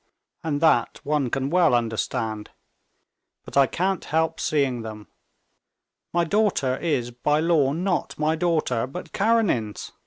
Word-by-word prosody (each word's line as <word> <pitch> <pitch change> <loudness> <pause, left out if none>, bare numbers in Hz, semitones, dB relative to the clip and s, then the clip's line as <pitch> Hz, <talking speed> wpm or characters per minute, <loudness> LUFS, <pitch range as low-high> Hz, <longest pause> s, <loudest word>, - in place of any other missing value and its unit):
And 150 -3 -2
that 155 -8 +3
one 145 -3 0
can 135 +3 -2
well 175 -7 +4
understand. 110 -2 -2 1.0
But - - -10
I 140 -1 +5
can't 185 +4 -1
help 160 +1 0
seeing 135 -5 0
them. 110 -2 -8 1.1
My 175 0 +2
daughter 170 -8 +1
is 135 -8 -1
by 150 +5 0
law 155 -4 +3
not 180 +4 -2
my 155 +1 +1
daughter, 155 -8 0
but 160 +7 -8
Karenin's. 200 - 0
150 Hz, 130 wpm, -24 LUFS, 125-170 Hz, 1.1 s, I